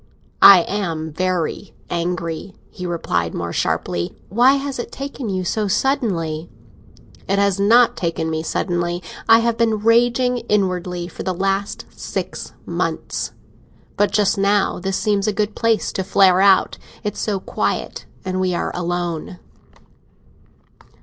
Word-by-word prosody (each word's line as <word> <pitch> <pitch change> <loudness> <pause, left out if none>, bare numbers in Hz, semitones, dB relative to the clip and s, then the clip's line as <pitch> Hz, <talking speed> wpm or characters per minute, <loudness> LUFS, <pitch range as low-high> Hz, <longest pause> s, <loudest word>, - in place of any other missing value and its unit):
"I 195 -3 +10
am 165 -5 -3
very 180 -1 -2 0.2
angry," 170 +1 -3 0.2
he 180 -2 -6
replied, 85 - -2
more 85 0 -4
sharply. 85 0 -1
"Why 245 +7 +5
has 275 -2 -3
it - - -5
taken 275 -4 -5
you 185 -1 -1
so 210 +3 0
suddenly?" 180 - -1 0.8
"It 195 - +1
has 200 -1 +2
not 230 +4 +5
taken 165 -2 -2
me 160 0 -2
suddenly. 175 +1 -2 0.3
I 225 0 +7
have 230 0 0
been 225 -2 +2
raging 245 +2 +3
inwardly 180 -3 0
for 175 - -9
the 185 -1 -2
last 195 +2 -1
six - - -5
months. - - -3 0.6
But 205 - +2
just 200 -1 +1
now 200 0 +2
this 190 +1 -2
seemed 205 -1 0
a - - +3
good 210 +1 -2
place 230 -1 +1
to 190 - -2
flare 190 -1 +4
out. 195 -1 +4 0.2
It's 210 - -3
so 205 -3 -1
quiet, - - -3 0.2
and 185 0 -2
we 185 -1 0
are - - -2
alone." 175 0 -3
195 Hz, 140 wpm, -20 LUFS, 175-215 Hz, 0.8 s, I